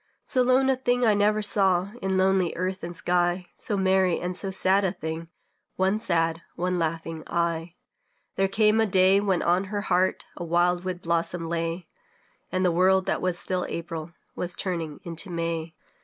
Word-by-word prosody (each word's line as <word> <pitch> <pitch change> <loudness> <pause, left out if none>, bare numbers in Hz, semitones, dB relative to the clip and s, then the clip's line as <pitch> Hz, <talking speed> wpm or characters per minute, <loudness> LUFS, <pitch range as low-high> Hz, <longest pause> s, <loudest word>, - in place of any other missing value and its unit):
So 255 - +1
lone 255 +1 +3
a - - +2
thing 245 -1 +1
I 220 - +5
never 210 +1 +2
saw 195 -2 +3
In 190 -1 0
lonely 190 -2 +2
earth 185 +2 -3
and 170 0 -5
sky; 180 0 +1
So 205 - -2
merry 190 -2 +2
and 180 +1 -3
so 195 +2 +1
sad 190 +1 +3
a 190 - +1
thing 160 -2 -6 0.5
One 190 +3 +1
sad, 165 -6 0
one 180 +1 -1
laughing, 165 0 -3
eye. 170 0 -2 0.6
There 195 - +2
came 215 +2 +3
a 220 - +2
day 190 0 +5
when 195 -3 0
on 180 +3 +2
her 205 +1 -3
heart 185 -2 +1
A - - -6
wild 175 +1 +1
wood 185 -1 -4
blossom 170 0 -1
lay, 165 +1 -3 0.6
And 185 0 0
the 180 - +3
world 185 +2 +3
that - - -1
still 180 +1 -2
was - - -4
April 165 -1 -5 0.3
Was 180 0 -4
turning 165 -5 -4
into 170 +3 -4
May. 165 -1 -3
180 Hz, 180 wpm, -26 LUFS, 170-195 Hz, 0.6 s, I